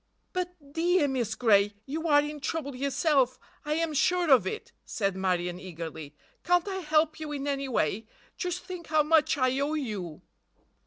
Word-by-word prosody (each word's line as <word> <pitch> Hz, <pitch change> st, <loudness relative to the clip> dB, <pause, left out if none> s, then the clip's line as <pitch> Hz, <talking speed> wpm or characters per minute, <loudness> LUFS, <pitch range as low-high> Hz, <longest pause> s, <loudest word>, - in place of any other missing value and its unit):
"But, 355 Hz, -6 st, -5 dB
dear 340 Hz, -1 st, +3 dB
Miss 245 Hz, -5 st, -1 dB
Gray—you 220 Hz, +8 st, +1 dB
are 290 Hz, -2 st, +6 dB
in 295 Hz, 0 st, -5 dB
trouble 285 Hz, -2 st, -3 dB
yourself, 275 Hz, -1 st, +1 dB, 0.3 s
I 300 Hz, -, -1 dB
am 330 Hz, -1 st, 0 dB
sure 350 Hz, +2 st, +2 dB
of 260 Hz, -, +6 dB
it," 440 Hz, -, -5 dB
said 195 Hz, -3 st, -2 dB
Marion 180 Hz, -2 st, -1 dB
eagerly. 160 Hz, -5 st, -7 dB, 0.3 s
"Can't 355 Hz, +1 st, +2 dB
I 385 Hz, -1 st, -2 dB
help 315 Hz, -2 st, +1 dB
you 310 Hz, -1 st, -5 dB
in 285 Hz, -1 st, -4 dB
any 275 Hz, -1 st, -2 dB
way? 215 Hz, -1 st, 0 dB, 0.3 s
Just 360 Hz, 0 st, -3 dB
think 360 Hz, -3 st, -7 dB
how 310 Hz, 0 st, +3 dB
much 310 Hz, 0 st, +3 dB
I 255 Hz, 0 st, +2 dB
owe 290 Hz, +3 st, 0 dB
you!" 205 Hz, -, -4 dB
285 Hz, 165 wpm, -28 LUFS, 220-325 Hz, 0.3 s, are